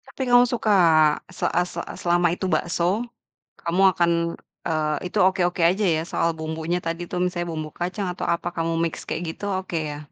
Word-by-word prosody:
Tapi 270 0 -10
kamu 245 0 +7
suka? 230 -3 0 0.6
Se 185 - -4
a 175 - +2
se - - -7
a - - -8
selama 175 0 +3
itu 185 - -4
bakso, 180 +6 0 0.6
kamu 170 +3 0
akan, 170 0 +2 0.6
eee, 155 -2 0
itu 185 - -5
oke-oke 180 -1 +2
aja 185 +5 +3
ya - - -1
soal 165 - +1
bumbunya 160 +2 -2
tadi 165 +1 -3
tuh, 180 - -2
misalnya 175 -1 -2
bumbu 155 -1 -4
kacang 185 +3 -2
atau - - -5
apa 170 - -7
kamu 165 0 -1
mix 165 - -1
kayak - - -3
gitu, 205 - -8
oke 185 -2 -4
ya? 145 - -6
175 Hz, 190 wpm, -24 LUFS, 165-185 Hz, 0.6 s, kamu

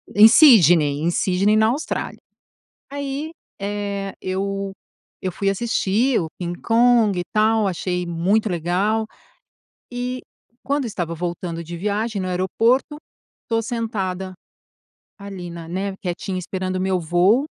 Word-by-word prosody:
em 215 +2 +10
Sydney, 175 - +6
em 170 +2 +1
Sydney, 195 +4 +2
na 220 0 +4
Austrália. 275 +7 -3 0.7
Aí, 285 +2 -4 0.3
eh, 200 -1 -3
eu 195 +1 -3 0.5
eu 185 - -2
fui 200 +3 -1
assistir 225 +3 +1
o 160 - -3
King 175 -1 -5
Kong 230 -4 +3
e - - 0
tal, 215 0 +3
achei 180 -1 -2
muito 180 +6 +1
legal, 190 +6 0 0.9
e, 250 +1 -3 0.4
quando 280 0 -1
estava 175 -7 -3
voltando 170 0 -4
de 170 +1 -7
viagem, 210 +3 -2
no 185 - -3
aeroporto, 225 - +1 0.5
estou 225 -1 0
sentada 195 -5 -3 0.8
ali 195 -3 -8
na 170 -1 -8
né, 190 +3 -3
quietinha, 185 +1 -3
esperando 185 +1 -4
o - - -1
meu 190 -1 +1
voo, 180 - +3
195 Hz, 130 wpm, -21 LUFS, 180-225 Hz, 0.9 s, em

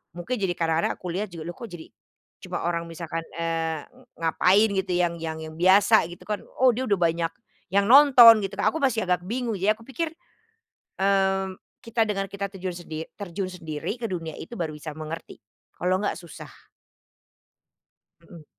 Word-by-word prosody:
mungkin 175 +9 -3
jadi 190 -3 0
kadang-kadang 165 0 +1
aku - - -14
lihat 200 +5 -2
juga 165 -2 -7
loh - - -15
kok 235 - -7
jadi, 165 -2 -9 0.6
cuma - - -4
orang 170 0 -1
misalkan, 165 0 -5 0.2
eee, 165 -2 -1
ng - - -22
ngapain 185 +6 +4
gitu 190 -1 -3
yang 175 -1 +2
yang 160 -1 -4
yang 155 0 -9
biasa 200 +1 +5
gitu 175 - -11
kan, 210 -1 -1 0.2
oh 255 -1 +6
dia 255 +3 -2
udah 200 -2 +2
banyak 165 -1 +1 0.4
yang 200 0 +3
nonton 250 -5 +9
gitu 195 - -4
Kak, 200 - +2
aku 320 - -4
masih 230 -6 +2
agak 180 0 +1
bingung, 235 0 -2
ya 210 +3 +3
aku 230 - -17
pikir, 320 +4 -3 0.9
mmm, 195 -1 +1 0.3
kita 230 0 +1
dengan 195 -1 -1
kita 200 0 -4
terjun 185 -2 -5
sendi 160 -2 -6
terjun 195 -1 -4
sendiri 165 +2 -5
ke 230 - -1
dunia 165 -4 -4
itu 235 +9 -8
baru 160 -2 -2
bisa 150 +1 -7
mengerti, 155 +1 -7 0.4
kalau 180 +1 +2
nggak 205 - -1
susah. 170 -4 -11 1.7
Mhm. 165 -3 -14
185 Hz, 180 wpm, -25 LUFS, 165-210 Hz, 1.7 s, nonton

